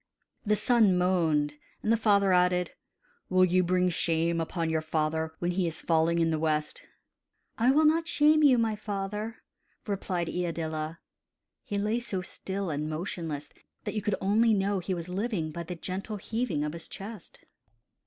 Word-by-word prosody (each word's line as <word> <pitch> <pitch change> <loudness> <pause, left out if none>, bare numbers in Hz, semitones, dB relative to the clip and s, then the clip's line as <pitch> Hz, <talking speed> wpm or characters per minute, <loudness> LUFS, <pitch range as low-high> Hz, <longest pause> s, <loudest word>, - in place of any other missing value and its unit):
The 210 - +4
son 215 -4 +4
moaned, 165 -5 +2 0.3
and 215 - +1
the - - +6
father 200 -4 +3
added: 180 0 +3 0.6
"Will 185 0 +5
you 185 +1 +3
bring 180 0 +2
shame 165 0 +1
upon 165 0 -2
your 160 0 +1
father 160 0 -1
when 175 0 -1
he 180 0 0
is 165 - -3
is - - -6
falling 165 0 +2
in 165 -1 +2
the 160 - 0
west?" 155 -1 -1 0.8
"I 235 +3 +4
will 305 +4 +5
not 325 +2 +3
shame 310 -2 +4
you, 275 -4 +6
my 225 -2 +1
father," 210 +2 -4 0.4
replied 190 -4 -2
Iadilla; 160 -2 -3 0.7
he 205 -6 -3
lay 210 +3 0
so 195 -6 -3
still 190 0 -4
and 150 +1 -2
motionless 155 -2 -4 0.3
that - - -4
you 215 - -1
could 210 -1 0
only 220 +3 +3
know 200 0 +1
that 175 - -10
he 190 - -1
was 170 -1 -6
living 185 -4 -2
by 170 - -5
the 170 +1 -6
gentle 190 +5 -5
heaving 220 -7 -2
of 150 0 -3
his 170 - -7
chest. 210 +2 -9
180 Hz, 175 wpm, -28 LUFS, 165-210 Hz, 0.8 s, the